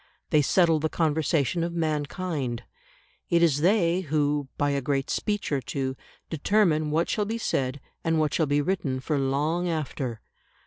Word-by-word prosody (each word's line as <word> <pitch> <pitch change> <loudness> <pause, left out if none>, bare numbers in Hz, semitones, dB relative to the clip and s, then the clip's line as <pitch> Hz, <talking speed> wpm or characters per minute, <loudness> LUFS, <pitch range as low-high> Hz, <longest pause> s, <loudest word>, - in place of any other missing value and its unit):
They 150 - +5
settle 165 +1 +3
the 160 +1 0
conversation 160 0 +1
of 170 0 -2
mankind. 150 -5 -2 0.7
It 170 -1 +4
is 145 -4 +3
they 175 -1 +3
who, 145 -3 0
by 145 0 +1
a 140 0 0
great 135 0 -1
speech 210 -5 -1
or 140 -2 +1
two, 130 0 -3 0.3
determine 160 -2 +2
what 160 +3 +1
shall 210 - 0
be 225 +3 -2
said 135 - -1 0.2
and 165 -1 +1
what 155 -2 +1
shall 160 - +2
be 145 +1 +2
written 145 -7 -1
for 145 +2 -1
long 150 +6 0
after. 135 -7 -3
155 Hz, 165 wpm, -26 LUFS, 140-170 Hz, 0.7 s, They